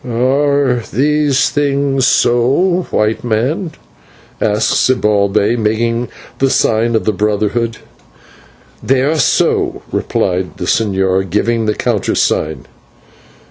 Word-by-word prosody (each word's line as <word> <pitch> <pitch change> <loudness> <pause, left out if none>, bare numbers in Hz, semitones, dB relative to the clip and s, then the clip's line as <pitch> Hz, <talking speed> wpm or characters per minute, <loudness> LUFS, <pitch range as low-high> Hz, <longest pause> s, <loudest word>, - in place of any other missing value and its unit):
"Are 130 +1 +1
these 145 +2 +1
things 140 -2 0
so, 140 +13 +2
White 110 +2 0
Man?" 130 - -1 0.7
asked 105 +1 +1
Zibalbay, 105 -2 +1
making 115 +2 -1 0.3
the 135 - +2
sign 115 -2 +1
of 110 - 0
the 110 - +1
brotherhood. 105 +3 -1 1.0
"They 130 -1 +1
are 155 +3 0
so," - - +1
replied 90 +1 -2
the 90 - -4
señor, 95 -2 0
giving 115 +4 0
the 105 - 0
countersign. 80 0 -1
115 Hz, 100 wpm, -14 LUFS, 105-135 Hz, 1.0 s, so